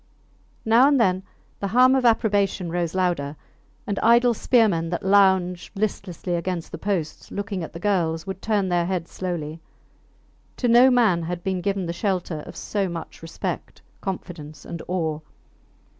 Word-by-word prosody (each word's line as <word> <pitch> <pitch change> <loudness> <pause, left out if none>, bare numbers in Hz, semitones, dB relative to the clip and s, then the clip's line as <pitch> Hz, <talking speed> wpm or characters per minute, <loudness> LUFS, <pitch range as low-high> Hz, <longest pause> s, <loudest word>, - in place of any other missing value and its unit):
Now 230 +4 +6
and 285 -2 +3
then 185 -5 +2 0.4
the 200 - -2
hum 250 +5 +5
of 265 -2 +2
approbation 205 -6 +2
rose 175 0 -2
louder, 175 -6 0 0.5
and 200 -2 -2
idle 235 +1 +5
spearmen 210 -9 +2
that 175 +2 -3
lounged 190 -3 +3
listlessly 195 -4 -3
against 175 0 -3
the 165 - -7
posts, 170 -6 -3
looking 200 -3 -4
at 160 - -8
the 170 - -7
girls, 170 -4 0
would 190 -1 -6
turn 205 -4 0
their 175 -1 +1
heads 180 -3 -3
slowly. 165 -3 -4 1.0
To 245 - 0
no 240 +2 +7
man 225 -9 +3
had 175 +1 -4
been 190 -2 -1
given 195 -1 -1
the 170 - -3
shelter 180 -4 -2
of - - -9
so 200 -3 -2
much 170 -2 -7
respect, 165 0 -5 0.2
confidence, 165 -6 -6
and 170 - -6
awe. 160 -4 -1
185 Hz, 160 wpm, -24 LUFS, 170-205 Hz, 1.0 s, no